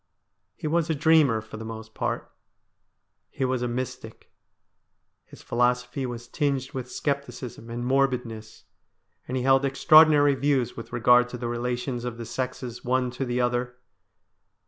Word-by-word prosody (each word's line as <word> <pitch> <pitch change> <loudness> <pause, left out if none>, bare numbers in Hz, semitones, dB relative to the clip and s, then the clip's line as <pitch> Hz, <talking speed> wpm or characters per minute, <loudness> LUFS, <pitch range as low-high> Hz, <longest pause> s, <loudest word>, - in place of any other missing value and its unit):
He - - -9
was 165 +1 +1
a 160 - +1
dreamer 150 -6 +4
for 110 0 -10
the 110 - -7
most 110 0 -8
part. - - -3 1.0
He 135 - -2
was 130 -1 -1
a 125 - 0
mystic. 125 +1 -6 0.9
His - - -15
philosophy 125 +2 0
was 120 -1 -7
tinged 135 -1 -1
with 130 -3 -6
scepticism 140 -5 -4
and 120 +1 -4
morbidness, 125 -5 -1 0.6
and 130 - -2
he 125 - -1
held 135 +1 +4
extra 140 +3 +6
ordinary 145 -2 +5
views 135 -3 0
with 115 - -9
regard 125 +1 +4
to 125 - -6
the 120 0 -4
relations 120 +1 -3
of 120 -2 -5
the 115 - -6
sexes 125 0 -5
one 125 0 0
to 130 +2 -3
the 120 0 -1
other. 125 0 -1
125 Hz, 155 wpm, -26 LUFS, 120-135 Hz, 1.0 s, extra